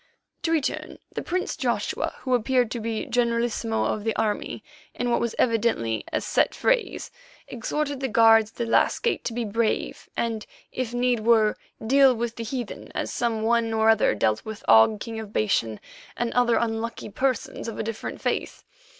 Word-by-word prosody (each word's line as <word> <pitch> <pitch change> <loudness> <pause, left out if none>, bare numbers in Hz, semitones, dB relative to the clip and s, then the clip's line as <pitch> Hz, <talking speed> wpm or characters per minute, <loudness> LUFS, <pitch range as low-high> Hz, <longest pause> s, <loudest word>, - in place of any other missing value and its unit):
To 330 - -1
return, 315 -4 -1 0.2
the - - -3
prince 365 +1 -2
Joshua, - - -1
who 255 - -1
appeared 245 0 +2
to 240 - -3
be 225 0 -3
generalissimo 235 -1 0
of 210 - -1
the 225 0 -1
army, 210 -1 -2 0.3
in 245 0 -1
what - - +2
was 235 -1 -2
evidently 220 - +1
a - - 0
set - - +1
phrase, - - 0 0.4
exhorted 285 +4 -3
the 265 - -1
guards 225 -2 +5
at - - -27
the 235 - -2
last 230 - +2
gates 470 - 0
to 235 - -2
be 240 0 -2
brave 220 +1 -1
and, 225 -2 -1 0.3
if 255 -3 -3
need 245 0 +1
were, 220 -1 +4 0.3
deal 270 +1 +5
with 235 0 -3
the 230 - -5
heathen 240 -1 -5
as - - -2
some 230 -2 -1
one 230 0 +2
or 220 0 +5
other 220 - +3
dealt 110 +1 +1
with 220 -1 -8
Og, 115 - +6
King 225 0 -5
of 215 -2 -8
Bashan, 115 - 0 0.4
and 240 -1 -1
other 245 -1 +3
unlucky 225 -1 -2
persons 255 +1 -2
of 230 - -5
a - - -2
different 225 0 -5
faith. - - -2
230 Hz, 180 wpm, -25 LUFS, 220-245 Hz, 0.4 s, Og